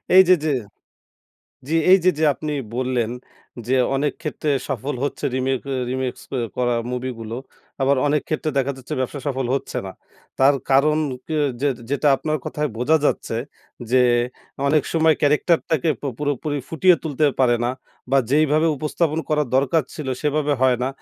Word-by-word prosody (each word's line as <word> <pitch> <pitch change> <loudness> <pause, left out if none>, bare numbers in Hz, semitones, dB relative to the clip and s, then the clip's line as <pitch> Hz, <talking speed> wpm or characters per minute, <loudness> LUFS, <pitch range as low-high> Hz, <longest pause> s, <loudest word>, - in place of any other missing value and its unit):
এই 190 - +11
যে, 185 - +8
যে 155 - +2 1.2
জি 160 - -1 0.2
এই 190 - +8
যে, 185 - +6
যে 160 - +2
আপনি 155 -1 -4 0.2
বললেন 125 -3 0 0.6
যে 130 - +1 0.2
অনেক 145 +2 0
ক্ষেত্রে 155 -1 -2 0.2
সফল 135 +2 -3
হচ্ছে 145 - -4
রিমেক 130 0 0
এ - - -1 0.2
রিমিক্স 130 -1 -3
অ্যা 135 - -2 0.2
করা 120 -1 +1 0.2
মুভি 125 +1 -3
গুলো। 115 +1 -5 0.5
আবার 140 +1 +3
অনেক 150 0 +1
ক্ষেত্রে 155 0 -1
দেখা 135 +1 0
যাচ্ছে 130 -1 -6
ব্যবসা 130 +2 -3
সফল 135 -3 -1
হচ্ছে 135 - -3
না। 95 - -7 0.5
তার 135 +2 +5 0.2
কারণ 150 +3 +4 0.3
কি 160 - -3 0.3
যে 145 - +2 0.2
যেটা 145 +1 +2
আপনার 155 +2 -2
কথায় 150 0 -2
বোঝা 135 +7 +3
যাচ্ছে, 115 - 0 0.5
যে 130 0 +5 0.7
অনেক 150 0 +3
সময় 160 -1 +4
ক্যারেক্টারটাকে 155 +1 +2
পু 145 - -4
পুরোপুরি 145 0 -2
ফুটিয়ে 170 +2 +4
তুলতে 155 -2 -1 0.2
পারে 120 -2 +4
না 120 - +1 0.4
বা 135 - +5
যেইভাবে 155 +2 +3
উপস্থাপন 155 +2 -1
করার 150 -2 +1
দরকার 140 +4 +2
ছিল 150 -4 -6 0.2
সেভাবে 150 0 +1
হয় 130 -1 +4
না। 130 - +1
145 Hz, 165 wpm, -22 LUFS, 130-155 Hz, 1.2 s, এই